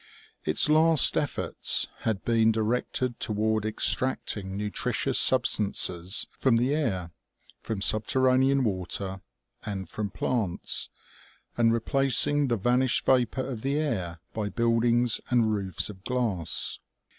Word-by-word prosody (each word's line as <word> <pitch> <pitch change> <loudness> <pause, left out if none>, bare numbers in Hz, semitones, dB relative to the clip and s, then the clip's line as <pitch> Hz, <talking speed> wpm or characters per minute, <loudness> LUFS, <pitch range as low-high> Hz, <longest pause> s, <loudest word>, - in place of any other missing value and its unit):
Its - - +2
last 155 0 +5
efforts - - 0
had 110 -4 -2
been 115 -1 +3
directed 120 +2 -1
toward 110 0 -1
extracting 105 -3 -2
nutritious 105 0 -1
substances 100 -7 +2
from 130 -4 +3
the 125 +4 +1
air, 95 - -2 0.5
from 110 -3 -4
subterranean 130 +6 +2
water, 95 -2 -3 0.4
and 95 -4 -5
from 105 -1 -4
plants, 100 -4 -2 0.7
and 115 -1 +3
replac 130 +2 +1
ing 145 -1 +1
the 120 -2 0
vanished 125 +4 +1
vapor 130 0 +2
of 125 -4 -6
the 135 +3 -1
air 95 - -2
by 105 -2 -3
buildings 115 +1 +1
and 115 -3 +2
roofs 95 -3 -1
of 95 -3 -11
glass. 105 -11 -2
115 Hz, 120 wpm, -27 LUFS, 100-130 Hz, 0.7 s, last